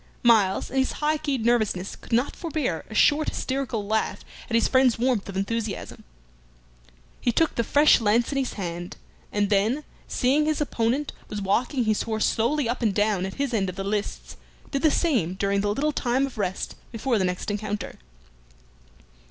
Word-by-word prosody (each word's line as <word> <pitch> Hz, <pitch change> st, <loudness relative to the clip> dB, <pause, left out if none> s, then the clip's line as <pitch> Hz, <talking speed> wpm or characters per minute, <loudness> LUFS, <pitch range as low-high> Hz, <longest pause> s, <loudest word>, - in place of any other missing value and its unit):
Myles, 215 Hz, -5 st, +3 dB
in 270 Hz, -, -3 dB
his 265 Hz, -, +1 dB
high 305 Hz, +1 st, 0 dB
keyed 270 Hz, -7 st, -2 dB
nervousness, 215 Hz, -6 st, +1 dB
could -, -, -16 dB
not 240 Hz, +4 st, +1 dB
forbear 305 Hz, -, -2 dB
a 215 Hz, -, -8 dB
short 300 Hz, +7 st, +4 dB
hysterical 260 Hz, -6 st, -2 dB
laugh 220 Hz, +2 st, -1 dB, 0.2 s
at 230 Hz, -, 0 dB
his 230 Hz, -, +4 dB
friend's 260 Hz, -2 st, +4 dB
warmth 240 Hz, -4 st, 0 dB
of 195 Hz, -, -5 dB
enthusiasm. 215 Hz, +1 st, -3 dB, 1.2 s
He 240 Hz, -, +1 dB
took 325 Hz, +7 st, +2 dB
the 235 Hz, -, 0 dB
fresh 290 Hz, +1 st, +5 dB
lance 225 Hz, +4 st, +2 dB
in 275 Hz, -, 0 dB
his 265 Hz, -, -2 dB
hand, 175 Hz, -2 st, -5 dB, 0.3 s
and 205 Hz, 0 st, 0 dB
then, 220 Hz, +9 st, +2 dB, 0.2 s
seeing 275 Hz, +4 st, +2 dB
that -, -, +1 dB
his 310 Hz, -, 0 dB
opponent 265 Hz, +1 st, 0 dB, 0.2 s
was 210 Hz, -, -4 dB
walking 240 Hz, +7 st, 0 dB
his 215 Hz, -1 st, +1 dB
horse 220 Hz, -1 st, 0 dB
slowly 240 Hz, +4 st, +1 dB
up 240 Hz, +2 st, -2 dB
and 215 Hz, -5 st, +1 dB
down 205 Hz, -3 st, +1 dB
at 190 Hz, -, -8 dB
his 275 Hz, -3 st, -2 dB
end 195 Hz, -4 st, +1 dB
of 185 Hz, -, -6 dB
the 195 Hz, -, -4 dB
lists, 205 Hz, +1 st, -3 dB, 0.3 s
did 275 Hz, -, -1 dB
the 315 Hz, -, +5 dB
same 240 Hz, -, +1 dB
during 200 Hz, +1 st, 0 dB
the 205 Hz, 0 st, 0 dB
little 295 Hz, +8 st, 0 dB
time 260 Hz, 0 st, +1 dB
of 260 Hz, -5 st, -8 dB
rest 190 Hz, -2 st, -2 dB, 0.2 s
before 230 Hz, 0 st, 0 dB
the -, -, +1 dB
next 180 Hz, +3 st, -2 dB
encounter. 210 Hz, -1 st, -4 dB
230 Hz, 185 wpm, -25 LUFS, 205-270 Hz, 1.2 s, fresh